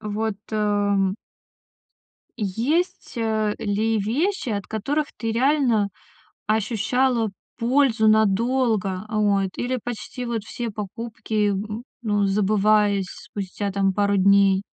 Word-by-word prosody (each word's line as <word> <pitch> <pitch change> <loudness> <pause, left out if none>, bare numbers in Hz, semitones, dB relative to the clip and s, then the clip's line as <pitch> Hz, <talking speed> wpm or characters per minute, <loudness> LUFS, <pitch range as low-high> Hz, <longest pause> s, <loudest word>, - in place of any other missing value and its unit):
вот, 215 0 -2 0.2
ам 205 -2 +1 1.3
Есть, 245 - -1
э, 220 -2 0
ли 215 +2 0
вещи, 265 - -1
от 200 -3 -3
которых 285 +8 -1
ты 225 -1 -2
реально 245 -4 +2 0.6
ощущала 225 +2 +1 0.3
пользу 240 -2 +3
надолго? 215 -2 +2
Вот, 205 -3 +1
или 250 +1 -1
почти 245 +1 -5
вот 230 -3 -3
все 235 +1 -4
покупки, 215 0 -3
м, 210 +3 -3 0.2
ну, 205 -3 +1
забывались 205 0 +2
спустя 200 0 -5
там 195 -1 +1
пару 200 0 +1
дней? 195 0 +4
215 Hz, 105 wpm, -23 LUFS, 200-235 Hz, 1.3 s, дней